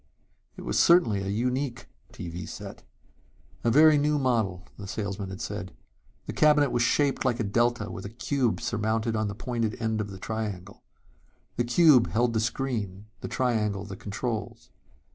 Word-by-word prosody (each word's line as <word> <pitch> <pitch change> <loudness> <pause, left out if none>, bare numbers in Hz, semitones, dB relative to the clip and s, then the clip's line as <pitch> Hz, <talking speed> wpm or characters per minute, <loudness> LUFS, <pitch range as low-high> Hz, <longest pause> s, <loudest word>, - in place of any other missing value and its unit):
It - - -8
was - - 0
certainly 165 - +5
a 95 - -4
unique 125 +4 -1 0.3
TV 85 0 -7
set. - - -8 0.8
A 120 - +3
very 150 +4 +6
new 150 +1 +2
model, 110 -9 0
the 100 - -9
salesman 100 -1 -4
had 95 +3 -7
said. 100 - -5 0.5
The - - -5
cabinet 150 -3 +4
was 120 - +1
shaped 140 +3 +2
like 125 -2 +1
a - - +1
delta 120 0 +1
with 95 - -7
a - - -5
cube 120 +1 -1
surmounted 115 -1 -1
on 110 -1 0
the 100 - -5
pointed 115 -1 -2
end 110 -2 -1
of 100 - -5
the 95 - -8
triangle. 100 -3 -5 0.7
The 120 - 0
cube 130 -1 +5
held 120 +1 +1
the 110 - +1
screen, 110 -5 -2
the - - -5
triangle, 105 -6 0
the 100 -1 -7
controls. 110 +3 -5
115 Hz, 165 wpm, -27 LUFS, 100-125 Hz, 0.8 s, very